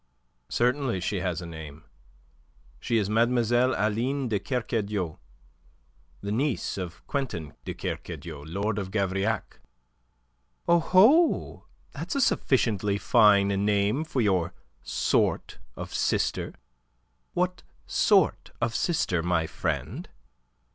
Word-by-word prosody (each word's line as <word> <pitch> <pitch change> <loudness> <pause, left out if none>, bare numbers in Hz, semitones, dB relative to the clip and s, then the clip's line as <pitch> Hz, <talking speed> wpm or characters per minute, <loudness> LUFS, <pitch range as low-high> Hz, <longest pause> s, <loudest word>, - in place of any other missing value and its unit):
"Certainly 125 -3 +1
she 100 +2 -1
has 90 -1 -2
a - - -6
name. 80 -2 -9 1.0
She 115 - 0
is 105 -3 +1
Mlle. 120 +3 +2
Aline 120 +6 0
de 105 -3 +1
Kercadiou, 105 - -2 1.0
the 100 - -4
niece 130 +3 -1
of 90 -3 -7
Quintin 95 - -3
de - - -4
Kercadiou, 80 -4 -6
Lord 100 +7 -2
of 95 -2 -4
Gavrillac." 100 0 -1 1.1
"Oho! 190 - +4 0.2
That's - - -5
a 280 - +2
sufficiently 105 - +2
fine 105 -3 +5
name 100 +6 +1
for 155 -5 -1
your 95 -6 +1 0.3
sort - - 0 0.2
of - - -7
sister. - - 0 0.8
What 180 +1 0 0.2
sort - - +3
of 120 -1 0
sister, 115 - 0
my 85 -1 +1
friend?" - - -3
105 Hz, 105 wpm, -27 LUFS, 95-125 Hz, 1.1 s, fine